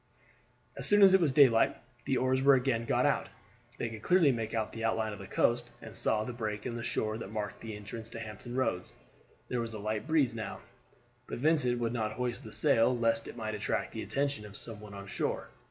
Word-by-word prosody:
As - - 0
soon 205 0 +6
as 190 -1 +8
it 190 - +6
was 155 -5 +3
daylight 130 -5 +5 0.3
the 130 - +1
oars 130 0 +2
were 140 0 +7
again 125 -3 0
got - - +2
out. - - +1 0.5
They - - -2
could 110 -1 -7
clearly 180 -3 +5
make 115 -2 -3
out 110 -1 -1
the 115 - -5
outline 110 -1 0
of 100 - -9
the - - -8
coast, - - +1
and - - -10
saw 110 -1 +1
the 125 - -5
break 105 -3 -4
in 120 - -3
the 120 - -4
shore 110 -1 -1
that 105 - -6
marked 105 -2 -4
the 110 -2 -6
entrance 110 +2 -7
to 115 - -7
Hampton 110 +2 -7
Roads. 115 -8 -1 0.5
There 125 -1 -1
was 115 -1 -4
a - - -5
light 110 +5 -3
breeze 155 -7 +3
now, 110 -2 -5 0.7
but - - -5
Vincent 130 -3 +2
would 115 -1 -1
not 110 -3 -1
hoist 125 +2 -3
the 110 - -9
sail 115 +3 +3
lest 115 -1 +1
it - - -9
might 110 -2 -3
attract 105 - -2
the - - -5
attention 140 -5 -1
of 105 -1 -8
some 115 -3 -3
one 105 -1 -10
on 100 0 -8
shore. 100 - -3
115 Hz, 230 wpm, -31 LUFS, 110-125 Hz, 0.7 s, as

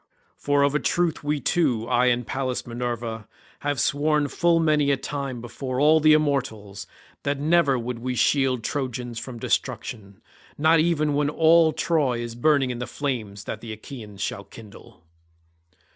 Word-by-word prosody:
For 145 0 +1
of 140 0 +2
a 150 - +2
truth 170 -2 0
we 150 0 0
two, 125 -6 0
I 125 +1 +2
and 125 -1 +1
Pallas 130 0 -3
Minerva, 115 -2 -4 0.3
have 145 -1 -2
sworn 150 0 +1
full 170 +2 +2
many 150 -3 +2
a 140 - +2
time 135 -3 -5
before 130 +2 -5
all 155 +2 +5
the 155 0 +5
immortals, 125 -10 -1 0.3
that 140 0 -2
never 150 -3 +3
would 120 0 -4
we 125 +1 -3
shield 130 0 +2
Trojans 125 -4 -3
from 120 +1 -8
destruction, 100 -3 -3 0.4
not 160 +2 +4
even 155 -2 +1
when 145 0 +1
all 160 +1 +5
Troy 150 -7 0
is 120 -1 -5
burning 135 +1 +2
in 120 - -5
the 125 - -4
flames 115 -8 -4
that 110 - -6
the 115 - -7
Achaeans 110 -2 -9
shall 105 -1 -3
kindle." 100 -3 -15
135 Hz, 160 wpm, -24 LUFS, 120-150 Hz, 0.4 s, all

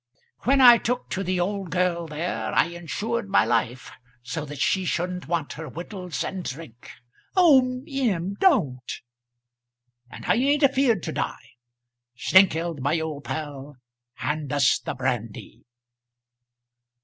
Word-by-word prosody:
When 270 +1 +4
I 240 -2 +9
took 245 +2 -3
to 195 - -2
the 185 0 -1
old 195 0 -2
girl 175 0 0
there, 160 +4 -3
I - - +5
insured 200 +7 -4
my 195 - +4
life, 125 +2 -1 0.3
so 150 +5 -4
that 145 0 -8
she 190 +6 +1
shouldn't 180 +1 -2
want 165 -3 -2
her 160 0 -7
wittles 180 -2 -5
and 185 -1 -5
drink 130 -5 -8 0.2
" - - -36
"Oh, 260 -7 +5
M., 210 - -1
don't!" 150 - +2 1.2
"And - - -10
I - - +3
ain't 285 +4 +2
afeard 260 - +3
to - - -3
die. - - -4 0.7
Snengkeld, 170 -3 +3
my 145 +5 0
old 155 -3 -5
pal, 145 -2 -6 0.4
hand 150 -2 -3
us 140 -1 +3
the - - -5
brandy." 120 -4 -4
175 Hz, 135 wpm, -25 LUFS, 150-220 Hz, 1.2 s, I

